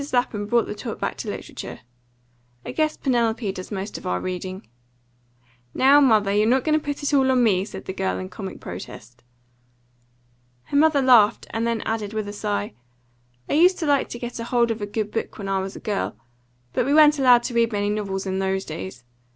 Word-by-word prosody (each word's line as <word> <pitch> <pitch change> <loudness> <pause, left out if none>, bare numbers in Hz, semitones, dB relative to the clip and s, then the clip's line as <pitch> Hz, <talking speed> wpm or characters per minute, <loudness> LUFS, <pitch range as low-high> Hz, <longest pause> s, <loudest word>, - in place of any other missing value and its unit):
Lapham 215 -4 0
brought 235 +1 +2
the - - -5
talk 205 - -6
back - - -2
to - - -5
literature. - - -7 0.8
"I - - -4
guess 310 -1 0
Penelope 235 -5 0
does 185 +1 -8
most 195 +1 -4
of - - -8
our 90 0 0
reading." 185 - -5 1.1
"Now, 275 +2 +6
mother, 215 -7 +4
you're 210 +1 +3
not 260 +1 +3
going 310 - +1
to 310 - +2
put 290 0 -4
it 285 - -1
all 265 -2 +4
on 255 -2 +3
me!" 190 -5 +3
said 210 - -9
the 190 - -4
girl, 95 - -1
in 95 0 -5
comic - - -8
protest. 120 +2 -9 1.4
Her 285 - -2
mother 295 -2 +4
laughed, 235 -4 +5
and 225 +1 -1
then 230 -1 -1
added, 220 -2 -3
with 215 -1 -3
a 205 - -6
sigh: 100 - -3 0.7
"I - - -2
used 360 +5 +5
to 320 - -3
like 285 -2 +2
to - - -6
get 240 0 -6
hold 235 0 +1
of 225 -1 -4
a 205 - -3
good 210 0 -3
book 225 - -4
when 200 - -6
I 195 0 0
was 190 +1 -5
a - - -7
girl; 205 -2 -2 0.6
but - - +1
we 285 - +3
weren't 300 -1 +6
allowed 250 -3 +6
to 245 - -4
read 230 0 +2
many 205 -1 0
novels 195 -2 -3
in 190 0 -2
those 190 0 -1
days. 155 -4 -7
220 Hz, 210 wpm, -23 LUFS, 195-255 Hz, 1.4 s, Now